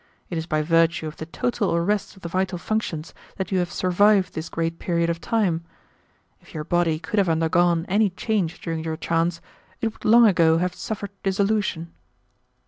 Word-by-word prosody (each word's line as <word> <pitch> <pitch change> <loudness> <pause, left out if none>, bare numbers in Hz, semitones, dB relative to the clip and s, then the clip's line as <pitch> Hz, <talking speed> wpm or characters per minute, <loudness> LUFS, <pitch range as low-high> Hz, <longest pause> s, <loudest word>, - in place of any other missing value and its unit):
It 170 - -2
is 160 - -5
by 155 -2 0
virtue 165 +1 +2
of 155 0 -6
the 160 - -7
total 205 0 -1
arrest 200 +6 0
of 190 - -18
the - - -3
vital 185 +1 -1
functions 170 -5 -3 0.2
that 190 -1 -4
you 190 - +2
have 175 -1 -1
survived 190 +1 +3
this 160 +1 -5
great 165 0 -2
period 170 -1 0
of 165 - -5
time. 185 -8 0 0.8
If - - -18
your 155 - -3
body 170 -1 +1
could 205 +6 -2
have 190 -3 +2
undergone 165 +1 +2
any 205 +2 +3
change 190 -3 -2
during 165 -2 -3
your 160 -1 -3
trance, 165 +1 0 0.4
it 225 -1 -1
would - - -19
long 235 +2 +7
ago 165 -5 +4
have 180 +1 0
suffered 205 -2 -5
dissolution." 195 -4 0
175 Hz, 185 wpm, -24 LUFS, 165-200 Hz, 0.8 s, long